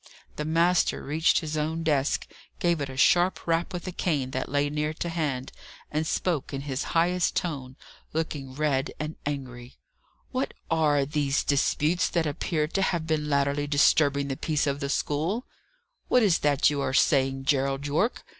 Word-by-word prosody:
The 150 - -3
master 170 +3 +2
reached 160 +6 +2
his 155 -1 -4
own 160 +2 -1
desk, 145 -3 +1 0.3
gave 170 -3 +1
it 140 - -3
a 130 - -8
sharp 175 +6 +3
rap 165 +2 0
with 180 -2 -5
a 185 - -3
cane 145 -7 -1
that 130 0 -3
lay 145 +1 +1
near 150 +1 -2
to 170 - -3
hand, 145 -6 -2 0.4
and 155 +1 -1
spoke 165 -6 -1
in 135 -1 -4
his 140 -1 -3
highest 180 +2 +2
tone, 135 -7 -3 0.4
looking 145 -4 -4
red 145 -2 0
and 155 +1 -4
angry. 130 -4 -6 0.5
"What 260 +1 -2 0.2
are 150 -4 +3
these 145 -1 0
disputes 150 +5 +1
that 170 -2 0
appear 150 +1 -1
to 195 - -1
have 170 -4 0
been 155 -2 -1
latterly 140 0 +1
disturbing 140 -1 +3
the 135 - -2
peace 155 -2 0
of 140 -1 -1
the 140 -1 -3
school? 160 - -1 0.6
What 250 - +4
is 190 -6 +3
that 145 -1 +3
you 145 -1 -1
are 135 - -1
saying, 135 -3 +2
Gerald 135 0 +1
Yorke? 160 - 0
150 Hz, 175 wpm, -27 LUFS, 140-165 Hz, 0.6 s, What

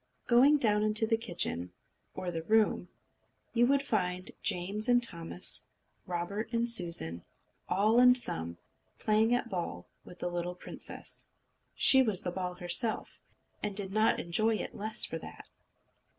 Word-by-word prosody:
Going 270 +5 +5
down 210 -6 +2
into 215 +1 +3
the 225 - +1
kitchen, 170 - -3 0.4
or 185 -1 -4
the 165 -1 -4
room, 215 -1 +1 0.6
you 240 0 +3
would 275 +1 +2
find 185 -7 -2
Jane 185 +4 -1
and 245 0 +3
Thomas, 170 -3 +1 0.3
and - - -22
Robert 200 +6 -4
and 235 0 0
Susan, 170 - +1 0.5
all 215 +5 +3
and 250 0 +7
sum, 85 - -3 0.4
playing 215 +2 +1
at 245 - -2
ball 170 - -5 0.2
with 180 - -14
the - - -4
little 175 0 -4
princess. - - -6 0.5
She 265 - +6
was 215 -7 +1
the 180 - -3
ball 180 0 -4
herself, 180 +6 -1 0.4
and 205 - -4
did 195 -2 -3
not 215 +1 +2
enjoy 215 +6 +1
it - - -5
the - - -13
less 215 +2 +2
for - - -5
that. - - -12
205 Hz, 155 wpm, -30 LUFS, 175-230 Hz, 0.6 s, and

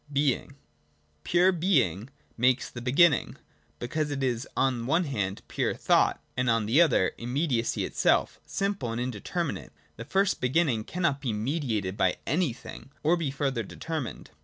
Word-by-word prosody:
(a) - - -13
Being. 140 -2 +2
86.] 140 0 -18 0.7
Pure 180 +2 +4
Being 135 - +1 0.3
makes 125 +2 +2
the 120 - -7
beginning: 140 +4 +3 0.4
because 150 +5 -2
it 140 -2 -3
is 125 -1 -1
on 125 -3 +1
one 165 +6 +3
hand 105 - -3
pure - - -1
thought, - - +2 0.2
and 125 -1 0
on 115 -2 +2
the 125 +10 +4
other 130 - +3
immediacy 125 0 0
itself, - - +1
simple 195 - -2
and 115 - -3
indeterminate; 120 -4 -3
and - - -26
the 115 - -7
first 195 +7 +1
beginning 125 -4 +1
cannot 170 -6 -1
be 125 -5 -1
mediated 110 - -2
by 95 -1 +2
anything, 145 -5 -3
or 160 +3 +4
be 165 -5 -2
further 135 -3 -1
deter 160 +9 -4
mined. 125 - -8
130 Hz, 160 wpm, -28 LUFS, 115-160 Hz, 0.7 s, Pure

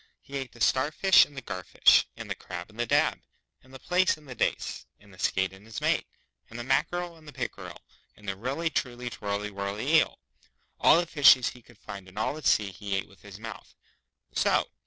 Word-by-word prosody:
He 140 - -11
ate 135 -2 -5
the 115 - -15
starfish 155 - +5
and 145 - -17
the 135 - -6
garfish, 90 -4 +3
and - - -7
the - - -2
crab 90 +2 -8
and 110 - -17
the 120 - 0
dab, - - +2 0.4
and 130 - -21
the 135 - -9
plaice 180 +4 +2
and 150 -1 -18
the 130 - -7
dace, - - -2
and 105 -1 -19
the 95 - -17
skate 95 0 0
and 95 +1 -15
his 110 0 -7
mate, - - +1 0.4
and 115 - -9
the 120 - -4
mackereel 175 +6 0
and 155 -1 -18
the - - -8
pickereel, 130 -3 -6 0.4
and 105 - -16
the 95 - -2
really 135 - -2
truly 120 -3 -3
twirly 105 -2 -3
whirly 100 +9 0
eel. - - +2 0.6
All - - +6
the 175 - 0
fishes 135 -6 +6
he 125 - -13
could 115 - -20
find 100 -2 -9
in 95 +2 -16
all 110 - 0
the 155 - -8
sea 105 -8 +2
he 100 +2 -4
ate 95 - -2
with 100 -2 -20
his 100 -2 -11
mouth 110 -2 -9 0.6
so! - - +2
115 Hz, 220 wpm, -28 LUFS, 100-140 Hz, 0.6 s, All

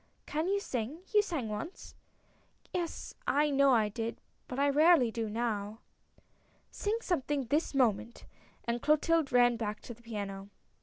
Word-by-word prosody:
" - - -41
Can 310 +3 -1
you 400 +1 +2
sing? 270 - -4
You 420 - +7
sang 325 - -3
once." 215 - -6 0.4
" - - -34
Yes, 345 -2 -3
I 295 +1 +3
know 275 0 +5
I 225 -4 +4
did, 225 +2 -4 0.3
but 250 - -6
I 280 +1 +3
rarely 295 -3 +5
do 225 -1 -3
now." 215 -2 -2 0.5
" - - -39 0.3
Sing 420 +2 -1
something 290 - -1
this 290 +4 0
moment! 235 -2 +1 0.2
" - - -30
and 235 0 -1
Clotilde 305 0 +2
ran 245 -1 +5
back 215 -2 -3
to 240 - -8
the 235 - -19
piano. 200 -4 -6
250 Hz, 170 wpm, -31 LUFS, 225-305 Hz, 0.5 s, You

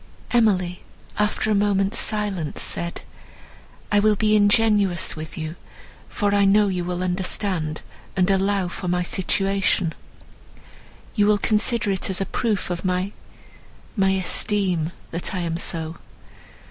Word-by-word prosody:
Emily, 190 -7 +2 0.4
after 210 +1 +1
a - - +4
moment's 200 +1 +2
silence, 205 -8 -1
said, 170 0 -2 0.9
"I 205 - +5
will 210 0 +4
be 215 +1 +2
ingenuous 205 -3 +3
with 155 0 -8
you, 160 +1 -5 0.5
for 205 -2 0
I 200 0 +4
know 205 +1 +4
you 180 -2 -1
will 180 +1 -3
understand, 180 -3 -2 0.3
and 180 -1 +3
allow 195 -1 +1
for 180 +1 -6
my 180 0 +1
situation; 195 -2 +1 1.2
you 205 -2 +3
will 210 0 +4
consider 215 +1 +1
it 190 0 -2
as 190 - 0
a 195 - 0
proof 210 -5 -1
of 175 - -3
my—my 190 +1 -4
esteem 190 -3 0 0.2
that 170 +3 -3
I 180 - -1
am 165 -1 -2
so. 165 -1 -4
195 Hz, 135 wpm, -23 LUFS, 180-205 Hz, 1.2 s, I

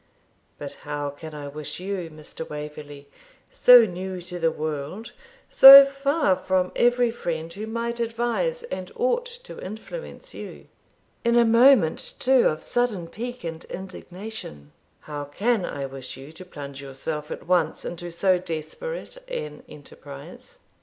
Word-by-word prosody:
But - - -7
how 145 -1 -4
can 155 +2 -10
I 145 -1 -7
wish 150 +3 -7
you, 185 -2 -4
Mr. 155 +1 -9
Waverley, 150 -1 -8 0.4
so 245 -2 +8
new 185 -1 -5
to 180 0 -7
the 165 -1 +3
world, 155 +7 -5 0.4
so 275 +1 +11
far 275 - +1
from 185 -1 0
every 245 0 +3
friend 165 -7 -4
who 210 +4 -6
might 235 +1 -3
advise 240 - -1
and 475 0 -6
ought - - 0 0.2
to - - -10
influence 220 - -9
you, - - -9 0.6
in 235 0 +2
a 235 - +6
moment, 230 - +4
too, 260 -1 +4
of 155 +1 -2
sudden 230 -9 -1
pique 245 +6 -7
and 165 -1 -6
indignation, 185 - -9 0.3
how 145 -1 -6
can 205 +7 0
I 140 -1 -4
wish 135 -1 -8
you 135 +3 -11
to 170 +3 -12
plunge 140 -5 -9
yourself 150 +3 -5
at - - -7
once 175 -3 +1
into 175 0 -6
so 180 +2 +2
desperate 185 - -6
an 485 -2 -5
enterprise?' 485 0 -12
185 Hz, 145 wpm, -24 LUFS, 155-245 Hz, 0.6 s, so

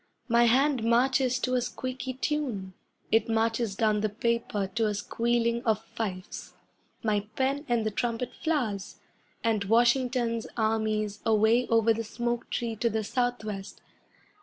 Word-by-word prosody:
My 235 0 +4
hand 260 +1 +3
marches 255 +2 +3
to 255 - 0
a 250 - +2
squeaky 255 +1 -4
tune, 255 -10 -2 0.4
It 225 0 +3
marches 225 -1 +1
down 215 -1 +2
the 215 - +1
paper 230 -1 -1
to 225 -1 +1
a 210 - -1
squealing 235 +2 0
of 220 -2 +1
fifes. 190 -4 -5 0.5
My 210 -2 0
pen 275 +3 0
and 235 -2 +1
the 215 - 0
trumpet 235 +3 -2
flowers, 240 - -1 0.4
And 220 -3 +1
Washington's 240 +1 +2
armies 215 -2 0
away 225 +2 +3
over 225 0 +4
the 230 +1 -3
smoke 240 +2 -3
tree 230 -2 -2
to 235 +2 +1
the 220 0 -1
Southwest. 215 -4 -3
230 Hz, 140 wpm, -28 LUFS, 215-245 Hz, 0.5 s, My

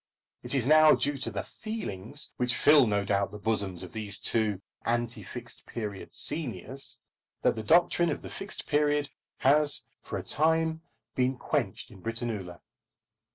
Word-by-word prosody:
It - - 0
is 130 -4 +2
now 155 +2 +7
due 145 -1 -1
to 120 - -3
the 100 -3 -4
"feelings" 145 - -5
which 125 -1 +1
fill 145 -4 +6
no 100 -1 0
doubt 100 0 +1
the 105 - -7
bosoms 100 -4 0
of 90 - -10
these 105 -3 0
two 110 -3 +1 0.2
anti 120 0 -1
Fixed 125 0 -9
Period 105 -4 -6
seniors, 135 - -2 0.5
that - - +3
the 110 - -4
doctrine 170 +6 +4
of - - -3
the - - -7
Fixed 195 - -4
Period 145 -1 +1 0.3
has 145 +2 +4 0.2
for - - -5
a - - -5
time 160 +1 +1 0.3
been 130 0 0
quenched - - -2
in 95 - -14
Britannula. 110 -6 -4
120 Hz, 155 wpm, -29 LUFS, 105-150 Hz, 0.5 s, now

